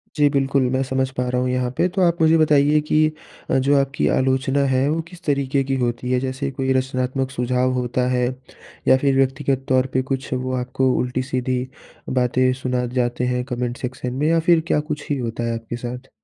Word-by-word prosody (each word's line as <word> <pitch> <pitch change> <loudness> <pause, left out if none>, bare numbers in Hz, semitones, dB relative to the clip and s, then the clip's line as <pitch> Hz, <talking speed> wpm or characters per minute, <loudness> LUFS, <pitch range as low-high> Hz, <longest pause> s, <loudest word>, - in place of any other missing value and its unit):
जी 145 -1 +4
बिल्कुल, 135 -1 +1
मैं 130 0 +1
समझ 130 0 -1
पा 125 0 0
रहा 125 0 0
हूँ 125 - 0
यहाँ 125 -1 0
पे 180 - +3
तो 190 +1 -2
आप 170 -2 +2
मुझे 160 +1 +5
बताइए 150 -1 +4
कि 155 +1 +2 0.4
अ, - - +3
जो 140 +2 +2
आपकी 135 +1 0
आलोचना 130 +1 +1
है 130 +2 +2
वो 165 +2 0
किस 180 -1 -14
तरीके 140 -1 0
की 135 0 -1
होती 120 +1 -2
है? 125 - +2
जैसे 130 +2 -3
कोई 130 0 -1
रचनात्मक 130 0 -1
सुझाव 125 +1 0
होता 125 0 -1
है 125 -1 +1 0.6
या 130 - +6
फिर 135 0 +1
व्यक्तिगत 135 0 0
तौर 130 0 +3
पर 130 - +3
कुछ 135 0 -2
वो 130 0 -2
आपको 130 +1 0
उल्टी-सीधी 130 0 -1 0.6
बातें 130 +1 +2
सुना 125 -1 -1
जाते 120 0 0
हैं 125 0 -1
कमेंट 120 0 -3
सेक्शन 125 -1 -5
में 145 +4 0
या 165 0 +3
फिर 165 -2 +6
क्या 150 - +2
कुछ 150 0 -5
ही 145 - 0
होता 120 -1 -3
है 115 - -1
आपके 115 +1 -6
साथ? 125 +2 -7
130 Hz, 205 wpm, -21 LUFS, 125-140 Hz, 0.6 s, या